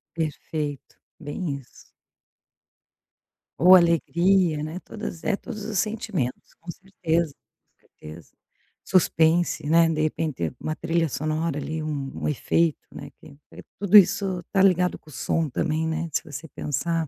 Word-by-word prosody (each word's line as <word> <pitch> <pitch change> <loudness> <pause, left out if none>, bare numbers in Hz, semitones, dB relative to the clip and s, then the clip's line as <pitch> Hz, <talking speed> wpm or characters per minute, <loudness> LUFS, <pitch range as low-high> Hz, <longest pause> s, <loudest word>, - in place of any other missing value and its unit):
Perfeito, 150 -2 -4 0.2
bem 155 +2 -5
isso. 135 - -16 1.8
Ou 180 +2 +8
alegria 170 -1 +3
né, 155 +4 -5
todas 210 -6 -7
é, 210 - +1
todos 215 0 -8
os 215 -2 -3
sentimentos, 190 - -3
com 170 +1 -7
certeza, 170 -4 -2 0.4
com - - -48
certeza. 75 +1 -13 0.5
Suspense, 165 -3 +2
né, 165 +1 +5
de 155 -1 -1
repente 155 - -2
uma 155 - -3
trilha 165 0 0
sonora 155 +2 -2
ali, 160 +1 -4
um 145 -3 -4
um - - 0
efeito 155 +2 +1
né, - - -9
que 140 -2 -15 0.4
tudo 200 +1 +6
isso 190 -1 +4
está 195 +2 0
ligado 180 -2 +3
com 155 - -19
o - - -13
som 160 +3 -1
também 160 +4 -1
né, 160 +1 -2
se - - 0
você 155 +1 -8
pensar. 160 +3 -2
165 Hz, 140 wpm, -24 LUFS, 155-180 Hz, 1.8 s, Ou